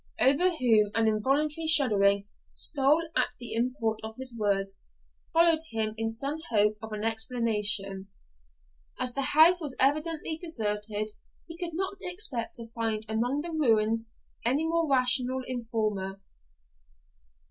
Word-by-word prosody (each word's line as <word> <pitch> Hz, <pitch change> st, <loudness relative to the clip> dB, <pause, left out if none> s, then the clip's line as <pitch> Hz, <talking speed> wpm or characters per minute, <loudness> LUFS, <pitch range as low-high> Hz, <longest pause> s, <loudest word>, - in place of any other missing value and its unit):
Edward, 265 Hz, +7 st, +3 dB
over 350 Hz, -3 st, 0 dB
whom 220 Hz, -6 st, +3 dB
an 225 Hz, -1 st, +2 dB
involuntary 290 Hz, +9 st, 0 dB
shuddering 200 Hz, -10 st, +5 dB, 0.3 s
stole 300 Hz, +3 st, +2 dB
at -, -, +2 dB
the 240 Hz, -, -6 dB
import 230 Hz, -2 st, -2 dB
of 220 Hz, 0 st, -7 dB
his 255 Hz, -2 st, -3 dB
words, 195 Hz, -2 st, -2 dB, 0.4 s
followed 330 Hz, -1 st, +4 dB
him 220 Hz, -1 st, -2 dB
in 225 Hz, 0 st, -3 dB
some 275 Hz, +7 st, -3 dB
hope 210 Hz, -1 st, +2 dB
of 220 Hz, -1 st, -9 dB
an 210 Hz, 0 st, -5 dB
explanation. 210 Hz, -4 st, 0 dB, 0.9 s
As 255 Hz, -1 st, +3 dB
the 275 Hz, -, -2 dB
house 320 Hz, +6 st, +5 dB
was 290 Hz, -4 st, -1 dB
evidently 310 Hz, +3 st, 0 dB
deserted, 215 Hz, -, -1 dB, 0.4 s
he 330 Hz, -, -9 dB
could 340 Hz, -2 st, -6 dB
not 380 Hz, +2 st, -3 dB
expect 260 Hz, -, -1 dB
to 230 Hz, -, -2 dB
find 220 Hz, -2 st, -2 dB
among 240 Hz, +6 st, -1 dB
the 340 Hz, +2 st, -6 dB
ruins 225 Hz, -6 st, +1 dB, 0.4 s
any 265 Hz, +6 st, 0 dB
more 330 Hz, -1 st, -1 dB
rational 255 Hz, 0 st, +2 dB
informer. 215 Hz, -6 st, -3 dB
235 Hz, 135 wpm, -27 LUFS, 215-295 Hz, 0.9 s, shuddering